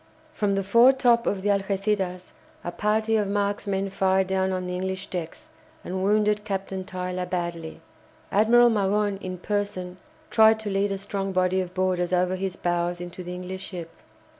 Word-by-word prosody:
From 205 -9 0
the 195 - 0
foretop 235 +3 +5
of 195 -2 -1
the 205 - +1
"Algéciras" 195 -2 -1 0.3
a 175 - -3
party 220 +3 +1
of 210 -2 0
marksmen 200 -1 -1
fired 190 0 +2
down 190 0 0
on 185 -1 -2
the 180 - -4
English 190 +1 -3
decks 180 - -6 0.3
and 185 +1 -3
wounded 210 +1 +2
Captain 195 -2 -3
Tyler 180 -1 -4
badly. 170 -3 -4 0.5
Admiral 235 +3 +5
Magon, 205 -1 +1
in 185 0 -5
person, 185 -2 -3 0.3
tried 220 0 +6
to 210 -2 -4
lead 195 +1 +1
a 195 - -1
strong 195 0 -3
body 185 0 +2
of 180 0 -7
boarders 185 -1 0
over 180 +1 +2
his 190 0 -3
bows 175 0 -1
into 175 +1 -7
the 180 0 -6
English 185 +1 -6
ship. 170 -3 -7
190 Hz, 165 wpm, -25 LUFS, 180-205 Hz, 0.5 s, tried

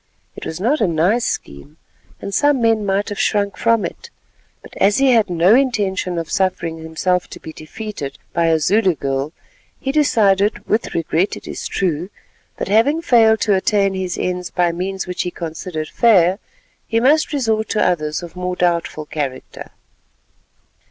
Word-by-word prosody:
It - - -7
was 160 - -5
not 245 +9 +1
a 210 - +3
nice 175 +8 +1
scheme, 70 - -5 0.4
and 200 - -6
some 290 +1 +3
men 225 -2 +2
might 195 +1 0
have 205 - -5
shrunk 200 -1 +1
from 230 -4 +2
it, 470 - -8 0.5
but - - -14
as 205 +1 +3
he 270 -1 +4
had 225 -5 +3
no 175 +3 +4
intention 205 -9 +1
of 165 -2 -4
suffering 175 -4 -1
himself 160 +3 -1
to - - -11
be 160 - -9
defeated 155 -4 -7 0.2
by 170 -1 +2
a 165 -1 +3
Zulu 185 +3 +2
girl, 135 +1 -2 0.5
he 270 - -2
decided—with 215 -6 +1
regret, 165 +3 0
it - - -12
is - - -5
true—that 180 0 -5
having 275 +11 +2
failed 225 -6 +4
to 210 - +2
attain 195 0 +2
his 185 -1 -3
ends 180 -1 -2
by 175 -1 +1
means 190 +3 -4
which 180 -1 -3
he 180 - -2
considered 160 -1 -6
fair, 190 -4 +4 0.5
he 225 - +1
must 295 +7 +3
resort 225 -6 0
to 215 - +1
others 155 -2 -1
of 170 - -10
more 180 0 -3
doubtful 170 -3 -1
character. 140 -4 -5
190 Hz, 165 wpm, -19 LUFS, 170-220 Hz, 0.5 s, he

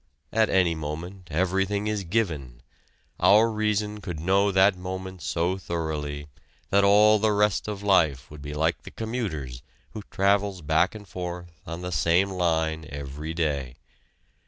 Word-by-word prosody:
At 110 0 +3
any 90 -3 +3
moment 80 +4 -6
everything 95 +5 0
is 105 -2 -1
given: 80 - -2 0.6
our 110 +3 +5
reason 105 -1 -1
could 85 -6 -5
know 95 +4 +2
that 95 +1 +4
moment 95 0 -6
so 90 +3 -1
thoroughly 75 -4 -4 0.4
that 100 0 +4
all 105 +2 +6
the 110 +1 +2
rest 105 -1 +1
of 105 -1 -5
life 80 -11 +2
would 75 -1 -10
be 75 +1 -6
like 80 0 0
the - - -10
commuter's 90 - -4 0.3
who 110 - -7
travels 100 -2 +1
back 80 +7 +2
and 105 -2 -10
forth 90 -1 -6 0.2
on 85 +2 -6
the 90 - -4
same 85 +4 +2
line 80 -3 0
every 70 +3 -6
day. 70 -7 -1
90 Hz, 150 wpm, -26 LUFS, 80-100 Hz, 0.6 s, all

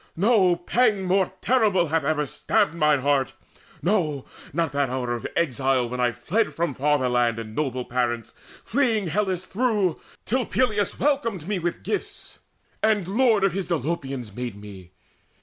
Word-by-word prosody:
No 190 -2 +4
pang 205 +3 +1
more 185 0 +1
terrible 210 -9 +2
Hath 160 0 +1
ever 150 0 0
stabbed 205 +7 +1
mine 150 -4 +2
heart 140 -2 +1 0.5
no, 160 -8 0 0.3
not 165 +1 0
that 140 -2 0
hour 125 -1 -2
Of 120 - -4
exile, 135 -5 +1
when 125 +1 -5
I 125 -1 +2
fled 155 - -1
from 165 -2 -1
fatherland 125 -5 +1
And 110 -1 -7
noble 130 -4 -2
parents, 120 -2 -2 0.3
fleeing 230 -5 +1
Hellas 185 0 -1
through, 210 -7 0 0.2
Till 255 +1 0
Peleus 215 -6 0
welcomed 230 - 0
me 205 -2 -1
with 175 0 -3
gifts, 415 - -5 0.4
and 210 -4 +2
lord 225 -1 +3
Of 195 -3 +3
his 195 0 -3
Dolopians 135 - -3
made 125 -4 -4
me. 95 -4 -11
165 Hz, 150 wpm, -24 LUFS, 130-205 Hz, 0.5 s, No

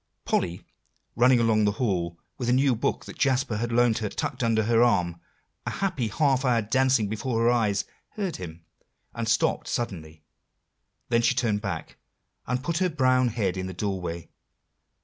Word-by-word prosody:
Polly, 85 -1 -1 0.5
running 125 +1 +5
along 110 -2 +3
the 105 - +2
hall, 90 -8 -1 0.2
with 120 -2 -1
a - - +4
new 135 0 +3
book 110 - -2
that - - -11
Jasper 130 -4 +1
had 120 +2 -2
loaned 120 -1 +3
her 105 -2 -2
tucked 130 +5 -4
under 115 -1 +2
her 115 +1 +3
arm, 85 -8 +2 0.5
a - - +1
happy 185 - -1
half 135 +3 +1
hour 125 -3 +3
dancing 130 0 +2
before 115 +3 -2
her 120 - +4
eyes, 105 -5 +1 0.3
heard 195 -5 -3
him, 85 -2 -9 0.5
and - - -3
stopped - - +1
suddenly, 80 -9 -4 0.9
then 115 -1 +3
she 115 - +2
turned 105 -4 0
back, 90 -6 -5 0.5
and 125 +1 -1
put 170 +2 -1
her 185 -1 +2
brown 130 -5 +3
head 105 -5 -1
in 95 0 -3
the 95 - -7
doorway. 90 -4 -3
115 Hz, 170 wpm, -26 LUFS, 100-130 Hz, 0.9 s, running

